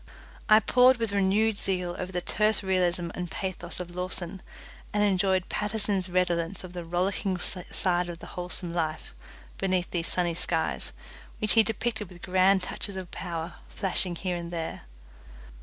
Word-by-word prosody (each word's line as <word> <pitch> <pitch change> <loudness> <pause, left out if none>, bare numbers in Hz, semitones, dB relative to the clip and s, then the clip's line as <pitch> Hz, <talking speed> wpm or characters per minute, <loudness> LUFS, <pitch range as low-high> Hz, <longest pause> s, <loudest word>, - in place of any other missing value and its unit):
I 215 0 +9
pored 250 +4 +5
with 230 -3 -1
renewed 200 +2 +2
zeal 180 -2 -1
over 185 0 -4
the 180 -1 -2
terse 215 +1 +1
realism 180 -2 +1
and 180 -1 -4
pathos 185 0 -3
of 175 -1 -7
Lawson, 180 0 -1 0.5
and 210 - +4
enjoyed 190 -2 +2
Paterson's 205 -3 +1
redolence 175 0 0
of 180 -1 -9
the 175 -1 -5
rollicking 185 +3 0
side 180 0 0
of 170 - -6
the - - -10
wholesome 180 -1 -2
life 160 -2 -2 0.5
beneath 185 -2 0
these 170 -1 -1
sunny 175 -2 +1
skies, 165 -1 -1 0.5
which 215 - +4
he 225 - +7
depicted 220 -2 -2
with 175 -1 -14
grand 185 +1 +4
touches 200 +2 -4
of 185 -2 -6
power 170 -2 -5
flashing 185 -2 0
here 180 0 -2
and 170 0 -6
there. 165 - -5
185 Hz, 155 wpm, -28 LUFS, 175-200 Hz, 0.5 s, I